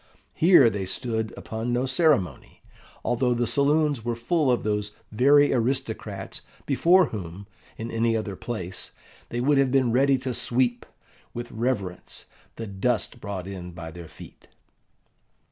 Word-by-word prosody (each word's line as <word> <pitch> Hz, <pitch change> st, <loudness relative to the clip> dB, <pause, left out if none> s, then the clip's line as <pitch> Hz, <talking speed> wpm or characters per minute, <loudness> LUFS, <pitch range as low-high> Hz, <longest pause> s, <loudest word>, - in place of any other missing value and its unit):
Here 165 Hz, -7 st, +6 dB
they 100 Hz, -3 st, -3 dB
stood 110 Hz, +1 st, -2 dB
upon 110 Hz, +2 st, -4 dB
no 120 Hz, +2 st, +1 dB
ceremony, 135 Hz, -, 0 dB, 0.4 s
although 120 Hz, 0 st, +1 dB
the 120 Hz, 0 st, +1 dB
saloons 145 Hz, -1 st, +2 dB
were 120 Hz, 0 st, -1 dB
full 140 Hz, +5 st, +1 dB
of 120 Hz, -, 0 dB
those 105 Hz, -1 st, -1 dB, 0.2 s
very 140 Hz, +6 st, +5 dB
aristocrats 115 Hz, -6 st, -2 dB, 0.2 s
before 170 Hz, +5 st, +4 dB
whom, 95 Hz, -1 st, -7 dB, 0.3 s
in 115 Hz, +1 st, -5 dB
any 115 Hz, 0 st, +1 dB
other 105 Hz, -3 st, -4 dB
place, 95 Hz, -5 st, -5 dB, 0.4 s
they 120 Hz, -, -3 dB
would 140 Hz, +3 st, +3 dB
have 135 Hz, -2 st, +3 dB
been 130 Hz, -3 st, +3 dB
ready 135 Hz, +3 st, +4 dB
to 130 Hz, -1 st, -4 dB
sweep, 120 Hz, +1 st, 0 dB, 0.5 s
with 120 Hz, 0 st, -6 dB
reverence, 110 Hz, -6 st, -3 dB, 0.3 s
the 115 Hz, -, -5 dB
dust 110 Hz, +4 st, -1 dB
brought 100 Hz, -3 st, -5 dB
in 90 Hz, -2 st, -7 dB
by 80 Hz, -1 st, -8 dB
their 85 Hz, 0 st, -10 dB
feet. -, -, -14 dB
120 Hz, 145 wpm, -25 LUFS, 105-130 Hz, 0.5 s, Here